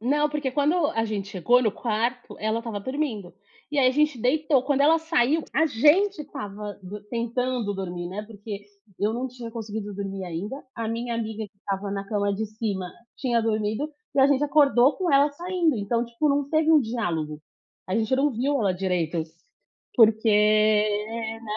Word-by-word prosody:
não 295 +6 +2
porque 295 -2 -2
quando 290 +5 +2
a 225 -4 0
gente 205 -3 -3
chegou 220 +7 +3
no 215 -4 +1
quarto, 235 +3 -2
ela 220 +1 0
estava 230 -3 -4
dormindo, 240 - -3 0.4
e 295 - -1
aí 255 -2 +5
a - - +1
gente 300 -3 +1
deitou 285 +2 +2
quando 280 0 +1
ela 320 +3 +5
saiu, 320 -2 +1
a 315 +6 +3
gente 315 - +3
estava 210 -7 -7
dor 205 +3 -8
tentando 235 -2 -1
dormir, 175 -2 -4
né, 200 +3 -5
porque 205 -1 -7 0.4
eu 210 +2 +2
não 245 +3 -2
tinha 245 -2 -8
conseguido 215 -3 -5
dormir 195 -1 -5
ainda, 190 - -5
a 230 -1 -3
minha 230 +1 -3
amiga 220 -1 -3
que 195 - -46
estava 195 0 -4
na 195 0 -4
cama 205 -1 0
de 220 +2 -2
cima 205 -4 -4 0.3
tinha 240 -3 +1
dormido, 220 +5 -1 0.3
e 275 - +4
a 270 - +7
gente 280 +1 +2
acordou 280 -3 +4
com 365 -3 0
ela 280 +1 +5
saindo, 345 -1 0
então, 230 +3 0
tipo, 235 +6 -1
não 280 0 +1
teve 315 0 +3
um 310 -2 +7
diálogo, 170 - -3 0.5
a 185 - 0
gente 225 +3 +1
não 280 +2 +2
viu 270 +4 0
ela 200 -4 +2
direito, 180 -3 -1 0.7
porque, 220 -1 +5
né. 215 +1 +2
230 Hz, 180 wpm, -25 LUFS, 210-275 Hz, 0.7 s, a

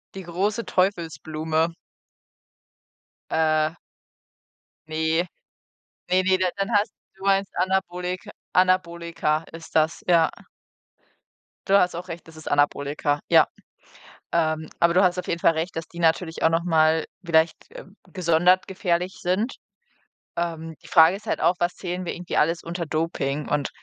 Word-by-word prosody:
die 190 - -6
große 200 +7 -1
Teufelsblume. 160 -3 0 1.6
Äh. 155 -1 +2 1.2
Ne, 160 +2 0 0.8
ne, 185 +1 +4
ne, 190 0 +3 0.2
dann 195 +4 -1
hast 205 0 +2 0.2
du 190 - -15
meinst 195 0 +1
Anabolik 180 -1 -1 0.2
Anabolika 170 -3 +1
ist 165 0 -11
das, 160 0 +2
ja. 170 -2 +5 1.4
Du 195 +1 +5
hast 180 -2 +2
auch 180 +2 -6
recht, 170 0 -8
das 160 - -14
ist 155 - -8
Anabolika, 145 0 +1
ja. - - +6 0.9
Ähm, 155 -1 0
aber 170 0 +4
du 185 - +5
hast 180 -1 +2
auf - - -3
jeden 170 - -2
Fall 165 - +5
Recht, 165 +3 -3
dass 165 -1 -4
die 170 - -12
natürlich 165 0 +1
auch 160 - +5
noch 165 +1 +1
mal 160 -1 +3 0.2
vielleicht 160 -1 +3 0.6
gesondert 180 +1 +3
gefährlich 180 -1 -1
sind. 190 +8 -1 0.8
Ähm, 165 -1 -3
die - - -14
Frage 165 +3 +6
ist 210 - -11
halt - - -1
auch, 180 - +3
was 175 0 0
zählen 180 0 -4
wir - - -3
irgendwie 175 0 -6
alles 165 +2 +2
unter 170 0 -4
Doping? 150 -2 -2
Und 145 -1 0
170 Hz, 140 wpm, -24 LUFS, 160-185 Hz, 1.6 s, ja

